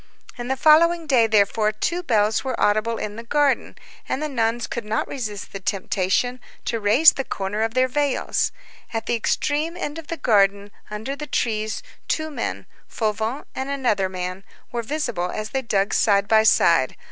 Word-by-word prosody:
On 240 Hz, -, -4 dB
the 265 Hz, +1 st, -1 dB
following 335 Hz, +3 st, +5 dB
day, 255 Hz, -6 st, +4 dB
therefore, 215 Hz, 0 st, +2 dB
two 340 Hz, +11 st, -2 dB
bells 220 Hz, -8 st, +1 dB
were 260 Hz, -2 st, -3 dB
audible 215 Hz, +2 st, +2 dB
in 210 Hz, 0 st, -5 dB
the 230 Hz, -, -7 dB
garden, 285 Hz, +3 st, +1 dB, 0.3 s
and -, -, -1 dB
the 305 Hz, -, -2 dB
nuns 235 Hz, -3 st, 0 dB
could 235 Hz, -, -5 dB
not 215 Hz, +1 st, -1 dB
resist 215 Hz, -7 st, -6 dB
the 195 Hz, -, -5 dB
temptation 195 Hz, +5 st, -1 dB, 0.3 s
to 230 Hz, -, -1 dB
raise 225 Hz, +10 st, +6 dB
the 270 Hz, -, -4 dB
corner 200 Hz, -2 st, -3 dB
of 225 Hz, +1 st, -1 dB
their 255 Hz, 0 st, +4 dB
veils. 285 Hz, +1 st, 0 dB, 0.4 s
At 225 Hz, -, -2 dB
the -, -, -1 dB
extreme 300 Hz, +8 st, 0 dB
end 310 Hz, -2 st, -4 dB
of 320 Hz, -, -11 dB
the 335 Hz, -, -4 dB
garden, 200 Hz, -4 st, +2 dB, 0.2 s
under 220 Hz, +6 st, -4 dB
the 300 Hz, +1 st, -7 dB
trees, 220 Hz, -4 st, -1 dB, 0.2 s
two 315 Hz, 0 st, -1 dB
men, -, -, -4 dB, 0.2 s
Fauvent 220 Hz, +4 st, -2 dB
and 265 Hz, +1 st, -4 dB
another 240 Hz, -9 st, 0 dB
man, 185 Hz, +1 st, -5 dB, 0.3 s
were 240 Hz, -, -2 dB
visible 235 Hz, -, -2 dB
as 215 Hz, +2 st, -5 dB
they 265 Hz, -, -1 dB
dug 205 Hz, -4 st, 0 dB
side 200 Hz, -2 st, +3 dB
by 220 Hz, 0 st, +5 dB
side. 165 Hz, -10 st, +4 dB
225 Hz, 180 wpm, -23 LUFS, 210-275 Hz, 0.4 s, raise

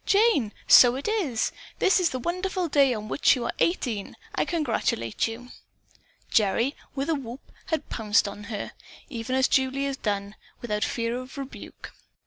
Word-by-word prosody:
"Jane, 405 Hz, -, +3 dB, 0.2 s
so 245 Hz, -1 st, +8 dB
it 275 Hz, -, -4 dB
is! 345 Hz, -, 0 dB, 0.3 s
This 380 Hz, -, +4 dB
is 355 Hz, -2 st, +2 dB
the 260 Hz, -, -3 dB
wonderful 365 Hz, +5 st, -2 dB
day 280 Hz, -3 st, +4 dB
on 215 Hz, -3 st, -3 dB
which 285 Hz, -, +3 dB
you 245 Hz, -, -3 dB
are -, -, -2 dB
eighteen. 240 Hz, -, -1 dB, 0.2 s
I -, -, 0 dB
congratulate 230 Hz, -, -1 dB
you!" 235 Hz, +2 st, -8 dB, 0.8 s
Gerry, 230 Hz, +6 st, +2 dB, 0.2 s
with 275 Hz, +1 st, -2 dB
a 330 Hz, -, +2 dB
whoop, 265 Hz, -3 st, -7 dB, 0.2 s
had 320 Hz, -4 st, -2 dB
pounced 215 Hz, -1 st, +2 dB
upon 205 Hz, 0 st, -6 dB
her, 210 Hz, -2 st, -5 dB, 0.4 s
even 245 Hz, -1 st, -3 dB
as 265 Hz, 0 st, +4 dB
Julie 265 Hz, +1 st, +1 dB
had 275 Hz, -1 st, -4 dB
done, 200 Hz, -1 st, -2 dB, 0.3 s
without 210 Hz, -3 st, -2 dB
fear 230 Hz, 0 st, -1 dB
of 255 Hz, +4 st, -10 dB
rebuke. 275 Hz, -1 st, -8 dB
255 Hz, 165 wpm, -26 LUFS, 225-300 Hz, 0.8 s, so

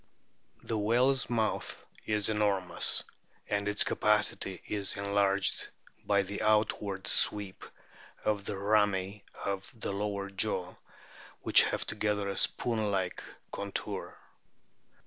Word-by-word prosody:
The 110 Hz, -, -2 dB
whale's 125 Hz, +6 st, +2 dB
mouth 110 Hz, -3 st, -1 dB, 0.2 s
is 105 Hz, -1 st, +1 dB
enormous, 100 Hz, -4 st, +2 dB, 0.4 s
and 100 Hz, 0 st, -1 dB
its 105 Hz, 0 st, +3 dB
capacity 105 Hz, -3 st, +1 dB
is 100 Hz, -2 st, 0 dB
enlarged 100 Hz, -1 st, +1 dB, 0.4 s
by 100 Hz, -1 st, +3 dB
the 100 Hz, +2 st, -5 dB
outward 105 Hz, -2 st, +1 dB
sweep 100 Hz, -1 st, +1 dB, 0.6 s
of 105 Hz, -2 st, 0 dB
the 105 Hz, -, -3 dB
rami 100 Hz, -1 st, +1 dB, 0.2 s
of 95 Hz, -1 st, -3 dB
the -, -, -3 dB
lower 100 Hz, -1 st, -3 dB
jaw, 95 Hz, -2 st, -1 dB, 0.7 s
which -, -, +7 dB
have -, -, -2 dB
together 105 Hz, -1 st, -1 dB
a 100 Hz, -, -4 dB
spoon 110 Hz, -3 st, +1 dB
like 95 Hz, -2 st, -1 dB, 0.3 s
contour. 100 Hz, 0 st, -5 dB
100 Hz, 110 wpm, -31 LUFS, 100-105 Hz, 0.7 s, which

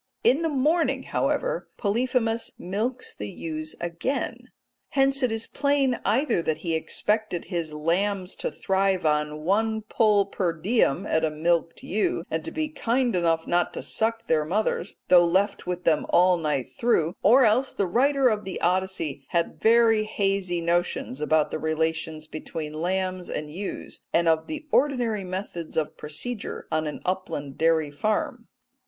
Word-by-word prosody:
In 275 Hz, +6 st, +4 dB
the 325 Hz, -, +1 dB
morning, 305 Hz, +4 st, +1 dB
however, -, -, -1 dB
Polyphemus 230 Hz, +1 st, 0 dB
milks 225 Hz, +8 st, -3 dB
the 105 Hz, -, -6 dB
ewes 155 Hz, +2 st, -5 dB
again. 175 Hz, +11 st, -3 dB, 0.4 s
Hence 275 Hz, 0 st, +2 dB
it 250 Hz, -3 st, +2 dB
is 225 Hz, 0 st, -1 dB
plain 280 Hz, -3 st, +1 dB
either 230 Hz, -, +2 dB
that 160 Hz, -2 st, -1 dB
he 165 Hz, -, 0 dB
expected 210 Hz, +3 st, 0 dB
his 170 Hz, -3 st, -3 dB
lambs 180 Hz, +5 st, -1 dB
to -, -, -2 dB
thrive 190 Hz, -2 st, 0 dB
on 150 Hz, 0 st, 0 dB
one 220 Hz, +5 st, +1 dB
pull 210 Hz, -2 st, +3 dB
per 185 Hz, -3 st, -1 dB
diem 185 Hz, -, +1 dB
at 160 Hz, -4 st, +1 dB
a 160 Hz, -, +3 dB
milked 165 Hz, +2 st, 0 dB
ewe, 195 Hz, -3 st, 0 dB
and 160 Hz, 0 st, -1 dB
to -, -, -5 dB
be 310 Hz, -1 st, -2 dB
kind 245 Hz, -5 st, 0 dB
enough 165 Hz, -2 st, +1 dB
not 175 Hz, 0 st, 0 dB
to -, -, -4 dB
suck 225 Hz, +1 st, -1 dB
their 155 Hz, -6 st, +2 dB
mothers, 195 Hz, +8 st, -1 dB
though 180 Hz, -1 st, +7 dB
left 190 Hz, +4 st, +1 dB
with 180 Hz, 0 st, -3 dB
them 155 Hz, -4 st, +2 dB
all 180 Hz, +1 st, +5 dB
night 150 Hz, -6 st, -1 dB
through, 180 Hz, -9 st, +1 dB
or 245 Hz, +7 st, +6 dB
else 245 Hz, +5 st, +3 dB
that -, -, -14 dB
the 200 Hz, -, +2 dB
writer 270 Hz, +8 st, +3 dB
of 215 Hz, -3 st, +1 dB
the 190 Hz, -, -5 dB
Odyssey 180 Hz, -6 st, -1 dB
had 170 Hz, -1 st, -1 dB
very 225 Hz, -1 st, +5 dB
hazy 195 Hz, -4 st, -1 dB
notions 170 Hz, -5 st, -1 dB
about 155 Hz, 0 st, +2 dB
the -, -, -3 dB
relations 160 Hz, 0 st, -1 dB
between 155 Hz, 0 st, -6 dB
lambs 185 Hz, +2 st, -2 dB
and 150 Hz, 0 st, -4 dB
ewes, 195 Hz, +4 st, -5 dB
and 170 Hz, 0 st, +2 dB
of 160 Hz, 0 st, +2 dB
the 310 Hz, 0 st, -5 dB
ordinary 245 Hz, -7 st, +2 dB
methods 185 Hz, -3 st, -5 dB
of 155 Hz, -2 st, -1 dB
procedure 200 Hz, +10 st, -4 dB
on 155 Hz, 0 st, 0 dB
an 150 Hz, -, -5 dB
upland 165 Hz, -7 st, -3 dB
dairy 160 Hz, -2 st, +2 dB
farm. 215 Hz, -, -2 dB
185 Hz, 160 wpm, -25 LUFS, 160-225 Hz, 0.4 s, though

